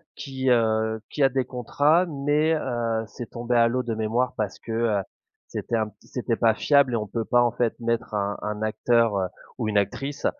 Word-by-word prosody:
qui, 130 -2 -3
heu, 110 -2 +2
qui 145 - 0
a - - +7
des 130 0 0
contrats 145 +8 +2
mais 150 +1 +1
heu, 115 -5 -1
c'est 115 +2 -9
tombé 120 +1 -2
à 115 0 +6
l'eau 125 +2 0
de 115 -2 -3
mémoire 115 +3 0
parce 105 -4 -2
que, 115 - -8
heu, 110 -3 +1 0.5
c'était 120 - -3
un 110 -2 +1
p 105 - -24
c'était 120 -2 -3
pas 115 -2 +4
fiable 140 -4 +3
et - - +2
on 110 -2 -1
peut 115 +2 -3
pas 120 +2 +4
en 120 - +2
fait 120 -1 -1
mettre 115 -1 -1
un 100 -1 -1
un 105 0 -4
acteur, 110 0 +2
heu, 95 -1 0 0.3
ou 115 -4 -2
une 105 -1 +1
actrice, 135 +8 -2
115 Hz, 215 wpm, -25 LUFS, 110-130 Hz, 0.5 s, a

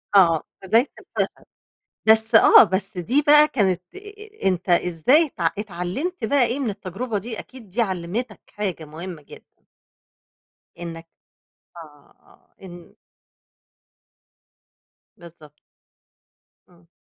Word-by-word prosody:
آه، 165 -5 +5 0.2
بداية 225 +8 +3
الفشل. - - -4 0.6
بس 220 +1 +4
آه، - - +8
بس 195 -1 -3
دي 240 - +1
بقى 300 +1 +7
كانت 190 - 0
أ - - -8
أ 415 - -8
أنت 185 0 -1
إزاي 180 - +3
تع - - -1
اتعلمت 210 - -4
بقى 280 +2 +2
إيه 245 +4 -2
من 260 -5 -1
التجربة 205 +3 -5
دي؟ 225 +3 -6
أكيد 250 -6 -12
دي 220 +7 -1
علمتك 190 +3 -3
حاجة 190 -6 -4
مهمة 165 +2 -9
جدًا. 145 - -15 1.4
إنك 165 -1 -8 0.7
آه، 150 -3 -15
آه، - - -27
إن 175 -2 -13 2.2
بالضبط. 155 -3 -16 1.1
إمم. 170 -1 -25
195 Hz, 115 wpm, -22 LUFS, 175-245 Hz, 2.2 s, آه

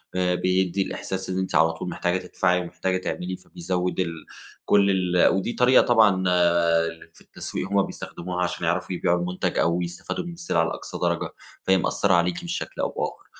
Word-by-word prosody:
آآ 90 -1 +1
بيدّي 95 +1 +1
الإحساس 95 0 -4
إن 95 - -2
أنتِ 95 - -2
على 80 0 +5
طول 80 - -5
محتاجة 90 +1 0
تدفعي 90 0 0
ومحتاجة 95 +1 -2
تعملي، 90 0 -4
فبيزوِّد 90 0 -3
ال 85 -3 0 0.5
كل 100 -1 +4 0.3
ال - - +6
ودي 95 +5 -1
طريقة 125 +1 +5
طبعًا 110 -5 +5 0.7
اللي 80 0 -9
في - - -20
التسويق - - -6
هم 100 0 +4
بيستخدموها 90 +1 -6
علشان 90 -1 -2
يعرفوا 85 +2 -1
يبيعوا 85 0 +1
المُنتج 90 +1 -2
أو 85 +2 +2
يستفادوا 85 - -4
من 175 - -6
السلعة 170 - 0
لأقصى 80 - -5
درجة، - - -1 0.3
فهي 95 0 +4
مأثّرة 100 +1 +1
عليكِ 85 0 +1
بشكل - - -4
أو - - 0
بآخَر. - - -4
90 Hz, 175 wpm, -24 LUFS, 90-95 Hz, 0.7 s, ال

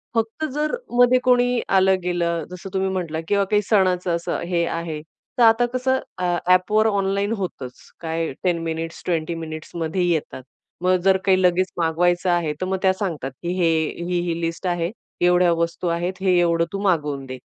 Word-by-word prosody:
फक्त 225 +7 -1
जर 300 +1 -1 0.3
मध्ये 245 +1 +6
कोणी 245 -1 +3
आलं-गेलं, 180 -3 +2
जसं 180 +1 -8
तुम्ही 190 0 0
म्हटला 175 -4 -3
किंवा 200 +1 +2
काही 210 -1 +4
सणाचं 185 -4 +2
असं 170 - -3
हे 170 -2 +1
आहे, 165 -2 -4 0.4
तर 245 - +4
आता 225 +1 +5
कसं 260 +1 +1 0.2
अ, 180 -1 0
ॲपवर 200 +4 +4
ऑनलाईन 200 0 0
होतंच. 135 -10 -7
काय 165 0 -2
10 175 -2 +1
मिनिट्स, 165 0 -4
20 170 -1 -1
मिनिट्समध्ये 160 +2 -4
येतात. 155 -5 -2 0.4
मग 185 +1 +3
जर 190 0 +5
काही 185 -1 +4
लगेच 180 +1 +3
मागवायचं 175 +2 +1
आहे, 170 -3 +1
तर - - 0
मग 190 +1 -1
त्या 190 - +4
सांगतात, 170 -9 -4
की 170 - -2
हे, 170 -2 +3 0.4
ही-ही 175 -1 -1
लिस्ट 165 +2 -3
आहे, 175 0 -1 0.3
एवढ्या 180 0 +4
वस्तू 170 +1 -2
आहेत, 170 +2 -1
हे 185 -2 +3
एवढं 170 -1 +2
तू 195 - -2
मागवून 150 -8 0
दे, 130 0 -7
180 Hz, 170 wpm, -22 LUFS, 165-195 Hz, 0.4 s, मध्ये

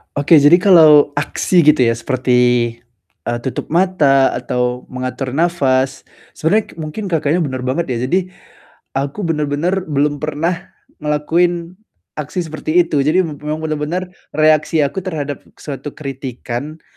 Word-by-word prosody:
Oke, 145 +3 +4
jadi 170 +5 +7
kalau 155 -6 +6
aksi 165 +4 +1
gitu 145 -5 +4
ya 115 - +2
seperti, 125 +1 0 0.9
eee, 120 0 -2
tutup 130 +4 -5
mata 155 -7 +3
atau 125 0 -2
mengatur 130 +1 -4
nafas 135 -5 0 0.3
sebenernya 205 +7 +1
k - - -15
mungkin 165 +6 -5
Kakaknya 165 -1 0
bener 130 -6 -3
banget 135 +6 -1
ya. 125 -1 -2
Jadi, 185 +7 0 0.7
aku 140 +9 -3
bener-bener 165 +3 -1
belum 145 -1 0
pernah 165 +5 -3 0.2
ngelakuin 170 +4 0 0.4
aksi 155 +3 -4
seperti 155 +3 +1
itu. 155 -4 -2
Jadi 155 +7 +3
m 150 -5 -6
memang 155 +1 -4
bener-bener 160 +4 -3 0.2
reaksi 155 0 +3
aku 145 +7 -2
terhadap 145 -5 -3 0.2
suatu 145 0 -7
kritikan, 135 +1 -6
150 Hz, 135 wpm, -17 LUFS, 135-170 Hz, 0.9 s, jadi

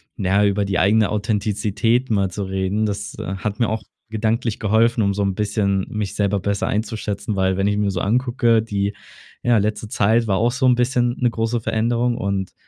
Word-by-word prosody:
na 95 - -2
ja, 100 +2 +4
über 100 +1 0
die 95 -2 0
eigene 105 +2 +3
Authentizität 105 +3 0
mal 100 -4 +1
zu 100 +3 -4
reden. 95 +2 -1
Das, 100 -1 -4
äh, 95 - -4
hat 105 +1 -4
mir 115 - +2
auch 110 0 -3 0.3
gedanklich 110 0 -1
geholfen, 110 +2 +2
um 100 0 +1
so 100 +1 -1
'n 100 -1 0
bisschen 100 -2 0
mich 105 -2 -4
selber 100 -1 +1
besser 100 +1 -1
einzuschätzen, 105 -1 -3
weil 95 -1 +1
wenn 95 +1 +1
ich 105 0 +1
mir 105 -1 +1
so 95 - -2
angucke, 120 +1 +2
die, 100 -2 -2 0.5
ja, 120 -1 +4
letzte 105 +1 -1
Zeit 110 +3 +2
war 95 -2 +1
auch 120 +2 +2
so 135 0 0
'n 125 -1 +5
bisschen 125 0 +1
'ne 125 - +3
große 115 +1 -1
Veränderung 120 +2 0
und, 100 -1 -2
105 Hz, 205 wpm, -21 LUFS, 100-115 Hz, 0.5 s, n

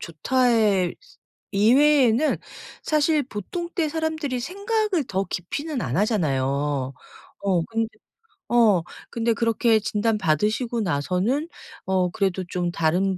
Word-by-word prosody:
좋다의 210 - +1 0.6
이외에는 255 +5 +4 0.4
사실 305 0 +2
보통 275 - -5
때 325 -4 0
사람들이 315 -5 -2
생각을 400 - -1
더 190 +1 -1
깊이는 280 - -4
안 125 - -2
하잖아요. 140 - 0 0.5
어 185 -4 +2
근데 225 +1 -2 0.6
어 220 -8 +4 0.3
근데 230 0 0
그렇게 230 0 +2
진단 215 +1 0
받으시고 215 - 0
나서는 185 - 0 0.4
어 185 -1 +1
그래도 190 -2 -1
좀 175 -1 -2
다른 180 +4 +1
220 Hz, 240 characters per minute, -24 LUFS, 180-275 Hz, 0.6 s, 이외에는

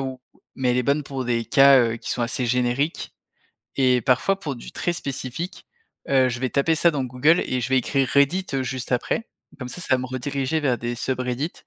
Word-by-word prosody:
où, 130 -1 -5 0.3
mais 125 -2 0
elle 125 - +1
est 125 - +2
bonne 140 +3 +1
pour 135 -2 -5
des 120 -1 0
cas 135 0 +6
heu, 115 -1 0
qui - - -7
sont 120 - -1
assez 120 +1 -2
génériques 125 +5 -1 0.6
et 125 -2 +3
parfois 135 +10 +2
pour 140 -7 -4
du - - -11
très 175 - -1
spécifique, 140 +3 -5 0.4
heu, 130 -2 +4
je 120 +1 -5
vais 130 - 0
taper 150 +4 +2
ça 170 +2 +4
dans 140 -4 -2
Google 130 +7 +3
et 130 - -1
je 120 - -2
vais 130 -1 +3
écrire 135 +1 0
Reddit, 155 +7 +2
heu, 135 - 0
juste 130 0 -4
après, 225 - -1 0.3
comme 125 -2 -6
ça, 180 - -8
ça 130 - +2
va 130 - +1
me 130 - -4
rediriger 135 +4 -2
vers 130 -5 +1
des 120 0 -3
SubReddit 130 +4 -2
130 Hz, 220 wpm, -23 LUFS, 125-140 Hz, 0.6 s, cas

